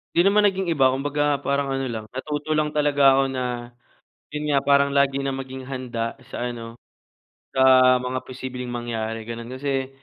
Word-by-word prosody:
Di - - +3
naman 210 +1 +4
naging 190 -2 +1
iba 135 -4 +4
kumbaga 145 +2 -1 0.2
parang 140 0 +1
ano 135 0 -1
lang 110 -1 -4
natuto 145 +4 -4
lang 155 0 +2
talaga 145 -1 +1
ako 135 - +3
na 130 -1 -3 0.9
yun 150 0 -4
nga 140 -2 +3
parang 140 0 +4
lagi 140 0 +3
na 135 -1 -2
maging 130 0 -7
handa 120 -4 -4 0.2
sa 125 - -3
ano, 115 -1 -8 0.7
sa 130 - -2 0.5
mga 130 0 -2
posibleng 125 -1 -7
mangyari 115 -2 -4
ganon 115 0 -7
kasi 135 0 -2
135 Hz, 170 wpm, -23 LUFS, 125-145 Hz, 0.9 s, naman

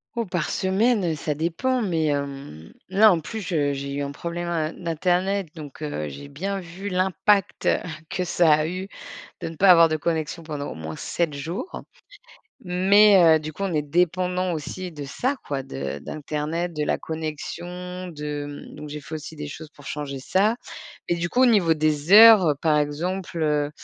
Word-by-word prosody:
Oh 235 - -1
par 180 -4 -2
semaine, 190 -2 +1
ça 150 0 -3
dépend, 175 - 0
mais 165 -6 0
hem 140 - -4 0.2
là 205 +2 +6
en 170 - +2
plus 220 +8 -6
je 150 -7 0
j'ai 140 0 -5
eu 140 - -2
un 140 0 -3
problème 170 +3 -5
in 165 -2 -1
d'internet. 180 +3 0
Donc, 155 -1 -9
heu, 75 - -3
j'ai 105 - -9
bien 195 +8 -3
vu 185 +3 -7
l'impact 190 +2 +1 0.4
que 185 - -2
ça 175 -2 +3
a 155 0 +2
eu 185 +3 -4 0.5
de - - -3
ne 165 - -9
pas 195 +4 +4
avoir 170 -2 +8
de 155 -1 -1
connexion 160 +1 -2
pendant 150 -3 -5
au - - -8
moins 80 0 -6
7 165 - -2
jours. 165 - -5 0.8
Mais, 190 -1 +6
heu, - - -7
du 155 0 -6
coup, 195 - -5
on 190 -3 -1
est 150 - +2
dépendants 180 +3 0
aussi 175 +4 -5
de 145 -2 -7
ça 250 - -1
quoi, 140 -2 -3
de 70 - -5
d'internet, 155 - -3
de 150 -1 -2
la - - +1
connexion, 175 +3 -6
de 150 -2 -6
mmh - - -12
donc 150 - -8
j'ai 150 0 -6
fait 155 +2 -7
aussi 155 +1 -8
des 150 -1 -6
choses 155 +2 -9
pour 145 - -15
changer 140 -1 -5
ça. 200 - +2 0.5
Mais 175 - +1
du 170 +1 -1
coup, 250 - +1
au - - +8
niveau 200 -9 +4
des 155 +2 +1
heures 210 -8 +9
par 155 -2 +3
exemple, 170 +5 -2
heu, 150 -2 +1
165 Hz, 190 wpm, -24 LUFS, 150-185 Hz, 0.8 s, heures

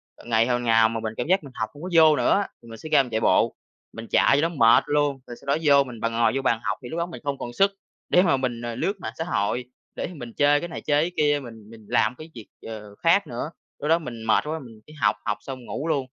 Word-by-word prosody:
ờ, - - -17
ngày 115 0 +2
hôm 120 -1 0
nào 115 -1 +4
mà 115 0 -3
mình 110 0 -4
cảm 125 - -2
giác 185 -2 +2
mình 135 -3 -12
học 110 - -2
hổng 145 +4 -12
có 185 - -4
vô 160 -2 +7
nữa - - +1
á, - - -4
thì 115 - -16
mình 115 - -9
sẽ 155 - -9
ra 145 -3 +5
mình 125 - -9
chạy 110 +1 -1
bộ, - - +3 0.4
mình 115 0 -8
chạy 140 - +4
cho 165 - +1
nó 170 - -10
mệt 115 -3 +6
luôn, 145 -2 +1
rồi 120 - -8
sau - - -17
đó 140 - +3
vô 140 -2 +6
mình 120 -4 -10
b - - -11
ngồi 115 -1 +2
vô 135 - 0
bàn 115 -4 +1
học, - - -1
thì 120 - -7
lúc 165 - -5
đó 170 - 0
mình 175 - -10
không 140 -1 -2
còn 120 - -6
sức 195 +8 +3 0.4
để 180 - +5
mà 170 -8 +3
mình, 125 -3 -3
ờ, 120 -1 -4
lướt 195 - -1
mạng - - -6
xã 165 - -2
hội, 125 -6 -1 0.3
để - - -3
mình 120 -7 -9
chơi 145 0 +3
cái 175 - -5
này 165 - -6
chơi 145 0 +2
cái 175 - -2
kia 145 -1 +3
mình 110 -3 -12
mình 110 -1 -14
làm 110 +3 +2
cái 155 +1 -10
việc, 115 -3 -10 0.2
ờ, 105 -2 -9
khác 175 - +2
nữa, 125 +6 -5 0.3
lúc 150 - -3
đó 165 - +4
mình 120 -8 -8
mệt 110 - +3
quá, 160 +1 -3
mình 115 -5 -13
chỉ 155 - -14
học 105 -9 +1
học 105 - -1
xong 130 -1 -8
ngủ 150 +7 -4
luôn. 140 -5 0
130 Hz, 300 wpm, -24 LUFS, 115-155 Hz, 0.4 s, vô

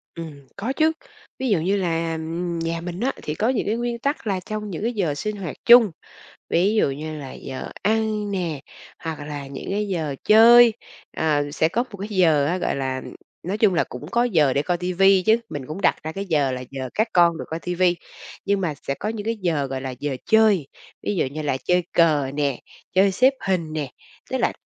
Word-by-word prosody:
Ừm, 150 -5 -9
có 235 +6 -3
chứ. 315 +2 +3 0.5
Ví 260 -1 -1
dụ 200 -6 +3
như 185 +5 +1
là, 165 -3 -1
ừm, 165 +2 -3
nhà 165 0 -2
mình 175 +1 -6
á, 260 +5 +1
thì 150 - -3
có 220 +8 +1
những 255 -4 0
cái 215 - +1
nguyên 240 0 -3
tắc 280 -2 -2
là 195 -2 0
trong 210 +3 -5
những 175 -2 -5
cái 235 +2 0
giờ 175 -9 -1
sinh 210 +9 -3
hoạt 180 -6 -5
chung, 235 -4 +8 0.6
ví 190 +5 +2
dụ 215 - +3
như 155 +3 -5
là 135 -2 -8
giờ 130 -1 -7
ăn 215 -1 0
nè, 170 -7 -2 0.4
hoặc 160 -2 -4
là 145 -2 -6
những 135 +5 -7
cái 210 +1 -1
giờ 160 -7 -2
chơi, 230 +2 +8 0.4
ờ, 145 -2 +1
sẽ 160 +1 +2
có 230 +8 0
một 200 - -8
cái 200 - -4
giờ 165 -8 +3
á, 170 +5 0
gọi - - -1
là, 130 -1 -2 0.4
nói 190 +5 -2
chung 215 -3 +4
là 170 - +2
cũng 125 +4 -9
có 235 - +3
giờ 160 - +3
để 140 - +2
coi 175 +4 -1
TV 180 +1 -3 0.2
chứ. 220 +1 +5
Mình 145 -3 -5
cũng 165 +6 -6
đặt - - +4
ra 160 - -4
cái 195 +4 -5
giờ 150 -7 +1
là 125 0 -4
giờ 130 -1 -5
các 220 +2 +1
con 170 -2 +4
được - - -6
coi 160 - -4
TV 180 +1 -4 0.6
nhưng 200 0 +1
mà 170 -5 -1
sẽ 140 - +1
có 210 - -4
những 215 -2 -5
cái 230 +1 0
giờ 155 -6 0
gọi 130 -1 -4
là 135 - -4
giờ 145 -1 -2
chơi, 215 -9 +4 0.4
ví 205 - -1
dụ 175 - +1
như 145 +4 -5
là 145 -3 -1
chơi 180 0 +2
cờ 150 -5 +3
nè, 140 -3 -1 0.3
chơi 195 +1 +4
xếp 255 +8 +4
hình 170 -5 0
nè, 150 -4 -3 0.4
tức - - +1
là - - +1
175 Hz, 230 wpm, -23 LUFS, 150-210 Hz, 0.6 s, chung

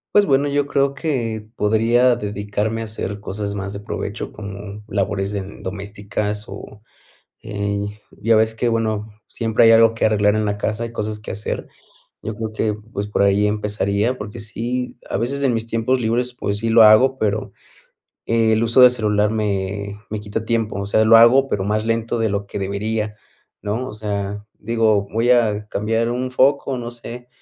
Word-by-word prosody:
Pues 205 0 +6
bueno, 140 -1 +2
yo 145 0 0
creo 140 -1 +1
que 115 -8 -3
podría 115 +4 +3
dedicarme 105 +1 -3
a - - -3
hacer 105 -2 -5
cosas 100 0 -4
más 100 0 -4
de 100 - -6
provecho 105 - -5
como 100 0 -8
labores 100 -1 -1
en 100 -1 -6
domésticas 105 +2 -4
o, 105 - -10 0.6
eh, 100 0 -3
y - - -20
ya 115 - +6
ves 110 +1 +2
que 120 - 0
bueno, 110 -2 -1
siempre 115 -1 +2
hay 115 - +8
algo 115 0 +6
que 115 - 0
arreglar 105 -1 +3
en 110 - +1
la 105 0 -1
casa 110 +2 -2
y 115 - -7
cosas 110 -2 -4
que 105 - -9
hacer. 105 +3 -4 0.5
Yo 110 - -5
creo 110 0 -5
que, 110 0 0
pues, 105 -1 -6
por 105 - -1
ahí 100 +1 +3
empezaría, 105 +2 0
porque 105 +1 -7
sí, 120 +4 -4
a - - -1
veces 135 +6 -2
en 130 -3 +3
mis 115 -1 -2
tiempos 115 +3 0
libres, 120 +2 0
pues 100 -4 -2
sí 115 +2 -2
lo 115 +1 +6
hago, 125 +5 +6
pero 105 -2 -1 0.8
el 110 -1 +2
uso 115 +2 +3
del 125 0 +9
celular 105 -3 +1
me 100 -1 -2
me 105 0 -4
quita 105 +2 -4
tiempo. 110 -3 -1
O 100 - -3
sea, 110 +2 +3
lo 115 +1 +7
hago, 125 +4 +6
pero 95 -6 -1
más 105 +2 0
lento 115 +1 0
de 115 -1 +1
lo 100 0 -2
que 100 - -6
debería, 105 +2 -2 0.5
¿no?, 110 +5 -2
o - - -7
sea, 105 -1 -4
digo, 110 -2 +1
voy 115 +2 +2
a 110 -4 +3
cambiar 115 +3 0
un 125 +1 -2
foco, 135 +1 +2
no 120 -1 -5
sé, 120 +1 -9
110 Hz, 190 wpm, -20 LUFS, 105-115 Hz, 0.8 s, del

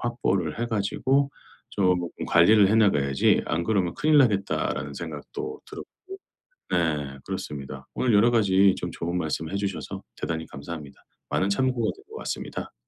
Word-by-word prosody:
확보를 100 -8 -1
해 - - +1
가지고 130 +6 +1 0.4
쪼끔 90 -3 0
관리를 100 +4 +6
해 - - +3
나가야지 70 -11 +3
'안 85 +1 0
그러면 95 -5 +1
큰일 155 0 +3
나겠다.'라는 105 -8 +1
생각도 425 +1 -6
들었고. - - -8 0.8
네. 75 -5 0
그렇습니다. 70 -2 -6
오늘 125 -3 +1
여러 110 +4 +5
가지 100 -3 +4
좀 - - -4
좋은 85 +2 -3
말씀을 80 0 -3
해 100 - -1
주셔서 100 -1 -4 0.2
대단히 80 -1 -3
감사합니다. 70 0 -8 0.3
많은 95 - +1
참고가 125 +3 +1
될 400 - -17
것 440 - -10
같습니다. - - -5
95 Hz, 350 characters per minute, -26 LUFS, 85-115 Hz, 0.8 s, 관리를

